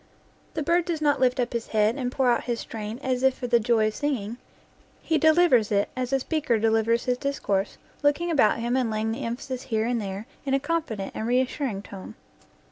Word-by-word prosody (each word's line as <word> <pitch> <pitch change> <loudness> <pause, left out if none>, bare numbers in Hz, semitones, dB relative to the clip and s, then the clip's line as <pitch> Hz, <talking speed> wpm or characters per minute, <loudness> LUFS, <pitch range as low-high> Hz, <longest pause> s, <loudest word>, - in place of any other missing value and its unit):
The 310 - -1
bird 340 +3 +2
does 335 -3 -2
not 290 -2 +2
lift 255 -1 +2
up 245 -1 -1
his 235 -1 -3
head 215 +1 +2
and 250 -3 -2
pour 260 -2 +2
out 235 - 0
his 240 -2 -2
strain 215 0 -6
as 255 -1 0
if 265 0 +3
for - - -5
the 240 -1 +3
joy 225 -1 +2
of - - -9
singing; 240 -6 -2 0.7
he 320 -1 +1
delivers 315 -9 +4
it 200 0 +2
as 255 0 -3
a 270 - +2
speaker 285 -4 0
delivers 225 +1 +2
his 250 -1 0
discourse, 205 -8 -1 0.2
looking 295 +4 +2
about 270 -9 +4
him 235 +2 -1
and 255 -3 +1
laying 220 0 -1
the 235 +5 -4
emphasis 250 +2 -4
here 220 -1 +1
and 240 -1 0
there 195 +1 -5 0.2
in 270 -1 +1
a - - +2
con 330 +4 0
fident 215 -10 -6
and 220 - -3
reassuring 250 -3 0
tone. 200 +2 -10
245 Hz, 215 wpm, -26 LUFS, 220-280 Hz, 0.7 s, delivers